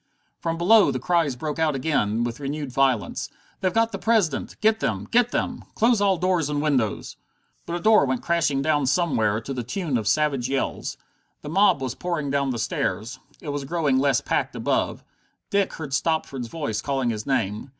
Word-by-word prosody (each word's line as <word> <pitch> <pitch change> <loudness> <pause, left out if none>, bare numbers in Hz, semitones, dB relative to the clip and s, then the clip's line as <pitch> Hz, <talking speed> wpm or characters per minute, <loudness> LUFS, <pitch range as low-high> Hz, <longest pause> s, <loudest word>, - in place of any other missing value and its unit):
From 165 -1 -2
below 205 +6 +5
the - - -1
cries 165 -7 +1
broke 150 +4 -4
out 155 -3 +2
again, 120 -6 0
with 120 +1 -4
renewed 145 -1 -4
violence: 130 -4 0 0.3
"They've 185 - +1
got 225 +2 +2
the - - -5
President! 215 -10 0
Get 220 +1 +3
them! - - -2
Get 245 0 +4
them! - - -2
Close 230 -1 +3
all 195 -2 +3
doors 180 -4 +1
and 145 -1 -1
windows!" 135 -8 -1 0.5
But 170 - -3
a - - -2
door 215 -4 +5
went 130 -2 -2
crashing 155 -5 +1
down 145 -2 +1
somewhere, 125 - +1
to 135 +5 -5
the 125 - -3
tune 135 - -2
of 105 - -5
savage 140 +1 +1
yells. 135 0 -2 0.5
The 150 - -6
mob 185 -5 +3
was 130 -2 -2
pouring 160 -5 -3
down 140 -1 +1
the 125 - -2
stairs. 115 0 -2 0.2
It 155 - -6
was 145 -1 -3
growing 140 -3 +1
less 135 -3 +2
packed - - -1
above. - - -1 0.5
Dick 200 -1 +1
heard 145 -4 -6
Stopford's 150 -5 -1
voice 115 -7 -3
calling 135 -4 0
his 105 +1 -5
name. 115 -2 -1
145 Hz, 190 wpm, -24 LUFS, 130-170 Hz, 0.5 s, below